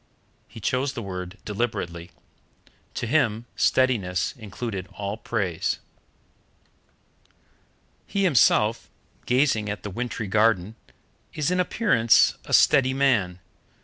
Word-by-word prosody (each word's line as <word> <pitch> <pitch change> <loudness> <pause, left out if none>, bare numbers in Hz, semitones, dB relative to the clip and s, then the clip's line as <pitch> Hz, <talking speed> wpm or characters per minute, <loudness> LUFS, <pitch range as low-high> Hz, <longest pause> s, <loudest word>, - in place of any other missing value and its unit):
He - - -12
chose 130 +5 -1
the 115 - -6
word 90 0 -6
deliberately. 95 -6 -3 0.9
To - - -3
him 115 -4 +1
steadiness 105 -10 +1
included 105 -3 -6
all 100 0 -4
praise. 100 -7 -2 2.3
He 200 - -1
himself, 115 - +3 0.4
gazing 125 -5 +2
at 105 - -5
the 105 - -5
wintry 115 +1 -4
garden, 105 -1 +2 0.6
is 155 +3 0
in 180 - +1
appearance 180 - +3
a - - -10
steady 135 -3 +4
man. 110 -10 +1
110 Hz, 105 wpm, -24 LUFS, 100-130 Hz, 2.3 s, steady